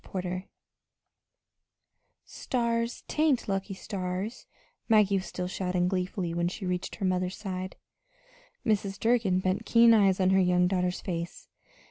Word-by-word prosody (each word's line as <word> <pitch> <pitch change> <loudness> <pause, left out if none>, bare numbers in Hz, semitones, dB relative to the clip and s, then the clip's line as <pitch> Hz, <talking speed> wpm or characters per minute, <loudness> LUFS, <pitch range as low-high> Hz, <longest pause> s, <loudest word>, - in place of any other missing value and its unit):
CHAPTER 190 - -5
XVII 185 +1 -5 1.8
"Stars 235 -2 -2
t'ank 300 -5 +1
lucky 195 0 -2
stars," 190 +3 -4 0.4
Maggie 210 -3 +5
was 190 - -4
still 180 - -4
shouting 180 -1 -1
gleefully 180 -2 -2
when 170 0 0
she 190 +2 -5
reached 180 0 -2
her 195 - -3
mother's 185 0 0
side. 185 -2 -5 0.9
Mrs. 200 -3 0
Durgin 225 -6 +2
bent 185 +3 0
keen 230 0 +6
eyes 195 -4 +4
on 185 0 +3
her 190 - +4
young 180 0 +3
daughter's 180 -1 0
face. 170 -2 -5
190 Hz, 135 wpm, -28 LUFS, 180-215 Hz, 1.8 s, keen